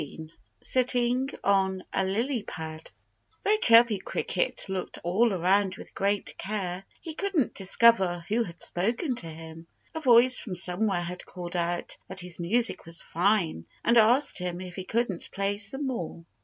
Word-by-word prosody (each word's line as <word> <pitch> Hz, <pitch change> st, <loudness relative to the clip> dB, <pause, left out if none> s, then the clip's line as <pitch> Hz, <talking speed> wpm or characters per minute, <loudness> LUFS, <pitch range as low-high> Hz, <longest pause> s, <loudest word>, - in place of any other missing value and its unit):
XVII 155 Hz, +2 st, -10 dB, 0.3 s
SITTING 250 Hz, +1 st, +1 dB
ON 190 Hz, -1 st, +1 dB
A -, -, +1 dB
LILY 230 Hz, +6 st, -1 dB
PAD 160 Hz, -3 st, -8 dB, 0.5 s
Though 425 Hz, +1 st, +3 dB
Chirpy 230 Hz, -, +5 dB
Cricket -, -, -1 dB
looked 190 Hz, -1 st, -5 dB
all 215 Hz, +7 st, +2 dB
around 190 Hz, +1 st, +1 dB
with -, -, -13 dB
great 200 Hz, +1 st, -2 dB
care, 190 Hz, -3 st, -3 dB, 0.2 s
he 325 Hz, -, -8 dB
couldn't 360 Hz, -5 st, -1 dB
discover 190 Hz, -3 st, +3 dB
who 225 Hz, +3 st, 0 dB
had 175 Hz, -6 st, -5 dB
spoken 230 Hz, -, -1 dB
to 170 Hz, -, -4 dB
him. 160 Hz, +1 st, -11 dB, 0.3 s
A 320 Hz, -, -4 dB
voice 250 Hz, -2 st, +6 dB
from 190 Hz, -6 st, -4 dB
somewhere 180 Hz, +1 st, +3 dB
had 180 Hz, +1 st, -6 dB
called 175 Hz, -1 st, -8 dB
out 175 Hz, 0 st, -2 dB
that 190 Hz, 0 st, -1 dB
his 180 Hz, -1 st, -5 dB
music 225 Hz, +7 st, +2 dB
was 165 Hz, 0 st, -2 dB
fine 175 Hz, -, -1 dB, 0.2 s
and 235 Hz, -, +3 dB
asked 235 Hz, +4 st, +4 dB
him 180 Hz, -1 st, -4 dB
if 180 Hz, -1 st, -8 dB
he 185 Hz, -1 st, -7 dB
wouldn't 225 Hz, -6 st, -1 dB
play 200 Hz, +1 st, -2 dB
some 245 Hz, +8 st, -1 dB
more. 175 Hz, -10 st, -5 dB
195 Hz, 160 wpm, -27 LUFS, 175-235 Hz, 0.5 s, voice